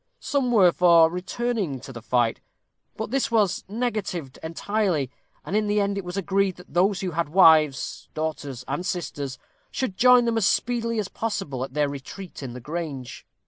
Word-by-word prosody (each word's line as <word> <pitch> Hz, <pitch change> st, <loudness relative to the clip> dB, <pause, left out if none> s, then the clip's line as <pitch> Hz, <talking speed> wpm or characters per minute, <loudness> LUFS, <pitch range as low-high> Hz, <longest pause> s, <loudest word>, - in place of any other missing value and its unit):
Some 270 Hz, -4 st, 0 dB
were 190 Hz, -7 st, +6 dB
for 170 Hz, -2 st, +5 dB
returning 190 Hz, -, -2 dB
to 135 Hz, 0 st, -9 dB
the 120 Hz, -, -8 dB
fight; 115 Hz, 0 st, +1 dB, 0.6 s
but 220 Hz, 0 st, -4 dB
this 270 Hz, 0 st, +1 dB
was 215 Hz, -5 st, +2 dB
negatived 205 Hz, -, -3 dB
entirely, 165 Hz, -, -1 dB, 0.3 s
and 200 Hz, -, -3 dB
in 215 Hz, 0 st, +2 dB
the 205 Hz, 0 st, +2 dB
end 200 Hz, 0 st, 0 dB
it 200 Hz, -, -3 dB
was 180 Hz, +2 st, -6 dB
agreed 195 Hz, -1 st, +1 dB
that 180 Hz, -, -16 dB
those 190 Hz, +2 st, +2 dB
who 185 Hz, -2 st, -2 dB
had 165 Hz, -1 st, -1 dB
wives, 155 Hz, -6 st, +4 dB
daughters, 145 Hz, -5 st, -4 dB
and 145 Hz, +6 st, -2 dB
sisters, 145 Hz, -7 st, -4 dB, 0.3 s
should 230 Hz, -8 st, -3 dB
join 250 Hz, -1 st, +6 dB
them 230 Hz, -1 st, +1 dB
as 200 Hz, -, +3 dB
speedily 230 Hz, -1 st, 0 dB
as 210 Hz, -3 st, -1 dB
possible 195 Hz, -, -3 dB
at 135 Hz, +1 st, -8 dB
their 150 Hz, -1 st, +2 dB
retreat 145 Hz, +7 st, -8 dB
in 130 Hz, -3 st, -6 dB
the 125 Hz, -, -7 dB
Grange. 145 Hz, -2 st, -6 dB
180 Hz, 180 wpm, -25 LUFS, 145-210 Hz, 0.6 s, were